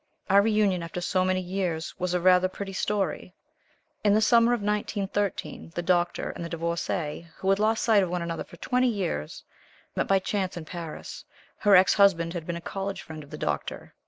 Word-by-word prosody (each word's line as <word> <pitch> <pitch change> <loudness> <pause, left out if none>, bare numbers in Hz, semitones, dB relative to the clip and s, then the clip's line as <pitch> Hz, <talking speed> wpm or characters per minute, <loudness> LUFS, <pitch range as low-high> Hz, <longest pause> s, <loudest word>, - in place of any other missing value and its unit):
Our 200 +1 +7
reunion, 210 -4 +2
after 170 +1 -5
so 185 +1 +1
many 185 0 +1
years, 180 -3 -3
was 180 0 -1
a - - +2
rather 180 +1 +5
pretty 195 +1 -7
story. 190 -2 -2 0.7
In 205 -1 +4
the - - +5
summer 230 +2 +5
of 240 -4 0
1913, 205 -4 -2
the 175 - -2
Doctor 175 0 +1
and - - -7
the 170 - -5
Divorcée, 170 -1 -3
who 190 - +1
had 195 - +2
lost 220 +1 +2
sight 220 -3 +5
of 185 - -1
one 175 0 -2
another 165 -1 -3
for 170 - -15
twenty 250 +5 +1
years, 180 - -3 0.5
met - - 0
by 195 - +4
chance 190 -1 -2
in 165 - -6
Paris. 165 -2 -7 0.4
Her 205 -2 +5
ex 185 +1 +6
husband 175 -5 +4
had 170 -3 -5
been 170 -1 -2
a - - -8
college 195 +3 -4
friend 155 -1 -8
of 145 - -16
the - - -7
Doctor. - - -4
185 Hz, 200 wpm, -27 LUFS, 170-200 Hz, 0.7 s, Our